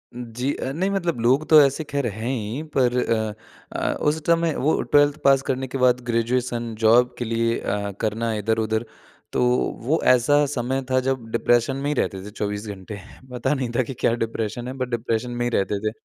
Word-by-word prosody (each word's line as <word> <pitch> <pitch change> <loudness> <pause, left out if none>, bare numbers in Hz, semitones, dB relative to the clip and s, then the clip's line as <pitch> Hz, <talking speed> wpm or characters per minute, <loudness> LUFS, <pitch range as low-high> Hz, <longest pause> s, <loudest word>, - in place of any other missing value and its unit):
जी, 125 +3 -3
अ, 130 - -4
नहीं 185 +5 0
मतलब 175 -9 -1
लोग 130 +6 +2
तो 155 -1 +9
ऐसे 140 +2 +2
खैर 140 -2 -2
हैं 110 +3 -4
ही, 120 +3 -3
पर 125 -2 +2
अ 110 -2 -1 0.5
अ, - - 0
उस 150 +1 +2
समय 170 -1 +3
वो 155 +4 +1
12th 145 0 +3
पास 135 -1 +5
करने 130 0 -1
के 135 - -4
बाद 125 -1 +3
ग्रेजुएशन 120 0 -1
जॉब 120 +3 +4
के 120 - -3
लिए 115 0 0
अ, 100 0 -2
करना 115 +1 -1
इधर-उधर, 110 +1 0 0.5
तो - - +1 0.4
वो 150 +8 0
ऐसा 145 +4 +3
समय 130 -1 -2
था 130 0 +3
जब 130 -2 -2
डिप्रेशन 120 +3 +2
में 140 +1 -2
ही 150 - +1
रहते 95 -2 -3
थे 105 - -8
24 105 0 -4
घंटे। 100 +1 -7 0.3
पता 125 +3 0
नहीं 130 -4 -2
था 130 - +3
कि 130 - -6
क्या - - +2
डिप्रेशन 115 +2 -4
है 130 - -4
बट 130 -1 -3
डिप्रेशन 120 0 -2
में 120 0 -2
ही - - +1
रहते 100 +1 0
थे। - - -8
120 Hz, 200 wpm, -23 LUFS, 115-135 Hz, 0.5 s, तो